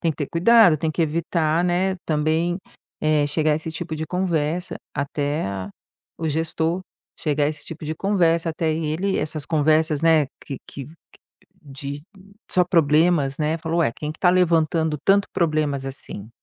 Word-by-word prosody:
Tem 165 - +1
que - - -20
ter 145 - -3
cuidado, 180 -1 +6
tem 155 +1 -1
que 165 - 0
evitar, 165 +1 0
né, 185 +2 +1
também, 160 +3 0 0.4
eh, 155 -1 +2
chegar 155 +1 +1
esse 160 +1 -5
tipo 160 0 -5
de 160 0 -4
conversa 175 -1 -1 0.2
até 145 +2 -2
a 100 0 -5 0.5
o 160 -1 -2
gestor. 160 +3 -1 0.4
Chegar 150 -1 +1
esse 155 -1 -7
tipo 160 -1 -8
de 155 +1 -3
conversa 170 -4 +2
até 160 0 -1
ele 165 +5 -1
essas 150 -1 -3
conversas, 155 -1 +2
né, 160 -3 +4 0.2
que 135 - -6
que 135 -2 -8
que 155 - -14 0.7
de 140 0 -7 0.5
só 180 -1 +3
problemas, 155 -4 +3
né, 155 +2 0
falou: 165 +1 -1
"Ué, 115 - +2
quem 150 0 -5
que - - -19
tá 180 - +4
levantando 165 -3 +2
tanto 200 +1 +4
problemas 150 -5 0
assim?". 120 -6 -6
160 Hz, 165 wpm, -22 LUFS, 150-170 Hz, 0.7 s, cuidado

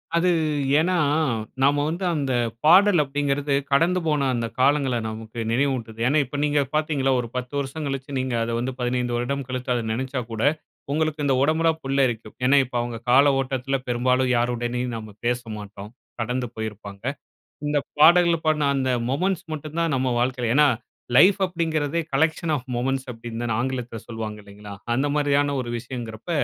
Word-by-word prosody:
அது 175 +2 +3 0.5
ஏன்னா, 180 +3 +1 0.7
நாம 145 +2 +3
வந்து 170 +4 -3
அந்த 140 -4 -1 0.3
பாடல் 185 +1 +6
அப்டிங்கிறது 145 0 -1 0.2
கடந்து 170 +6 +3
போன 150 -3 +1
அந்த 115 -1 -1
காலங்கள 135 -1 +3
நமக்கு 110 +1 -7
நினைவூட்டுது. 120 -3 -1
ஏன்னா, 145 +4 +3
இப்ப 130 +3 -6
நீங்க 145 0 +2 0.2
பார்த்தீங்கள்ல 150 -3 +1
ஒரு 120 - -6
10 125 +1 -4
வருசம் 140 +3 -4
கழிச்சு 135 0 -4
நீங்க 130 -2 -1
அத 115 - -3
வந்து 130 +2 -2
15 125 0 -1
வருடம் 135 +3 -2
கழித்து 130 0 -3
அத 120 - 0
நினைச்சாக்கூட, 125 -2 -4 0.5
உங்களுக்கு 155 0 0
இந்த 135 -2 +3
உடம்புலாம் 160 +2 +2
புல்லரிக்கும். 130 -5 0
ஏன்னா, 135 +3 +5
இப்ப 125 - -11
அவங்க 120 -1 -4
கால 140 +2 +6
ஓட்டத்தில 135 0 -1
பெரும்பாலும் 125 +1 +1
யாருடனும் 120 0 -1
நாம 110 -2 -9
பேசமாட்டோம். 105 -4 -5 0.3
கடந்து 125 +2 -2
போயிருப்பாங்க. 105 -2 -7 0.6
இந்த 145 0 +2 0.2
பாடல்கள 170 +2 +6
பாடுன 150 -2 +2
அந்த 130 -1 0 0.2
மொமென்ட்ஸ் 180 +6 0
மட்டும் 155 +1 -6
தான் 165 -2 +1
நம் 130 0 0
வாழ்க்கையில 125 -2 0
ஏன்னா, 150 +1 +6 0.5
லைஃப் 185 +8 +7
அப்டிங்கிறதே, 165 -3 -1
கலெக்க்ஷன் 160 +3 +1
ஆஃப் 130 -1 -9
மொமெண்ட்ஸ் 130 +2 -1
அப்டின்னு 115 0 -7
தானே 115 -2 -1
ஆங்கிலத்தில 125 -3 -3
சொல்வாங்க, 110 -2 -5
இல்லைங்களா? 100 0 -10 0.2
அந்த 135 +4 +1
மாரியா 145 -1 +3
ன 140 - -1
ஒரு 120 - -6
விஷயம்ங்கிறப்ப, 120 +2 -7
130 Hz, 155 wpm, -24 LUFS, 120-150 Hz, 0.7 s, லைஃப்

